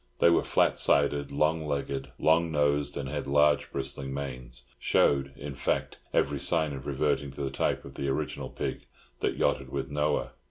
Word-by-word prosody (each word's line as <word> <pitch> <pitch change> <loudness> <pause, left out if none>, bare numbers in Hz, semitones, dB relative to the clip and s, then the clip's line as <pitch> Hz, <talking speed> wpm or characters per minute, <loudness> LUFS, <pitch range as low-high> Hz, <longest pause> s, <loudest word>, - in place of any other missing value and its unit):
They 85 - +5
were 85 - +4
flat - - +2
sided, 70 0 +2
long 75 +2 +1
legged, 70 -1 -3
long 80 +1 +3
nosed, 75 -1 +1
and 70 -2 -3
had 65 - -4
large 75 +1 +3
bristling 70 0 -3
manes—showed, 65 +1 0
in 70 -1 -6
fact, 70 - -1
every 70 0 +1
sign 80 -2 +2
of 65 0 -7
reverting 70 0 0
to 70 - -7
the 70 - -2
type - - -1
of 70 - -10
the 70 - -3
original 70 +2 -2
pig - - -4 0.3
that - - -1
yachted 65 -1 +1
with 70 +1 -4
Noah. 75 0 0
70 Hz, 170 wpm, -29 LUFS, 70-75 Hz, 0.3 s, They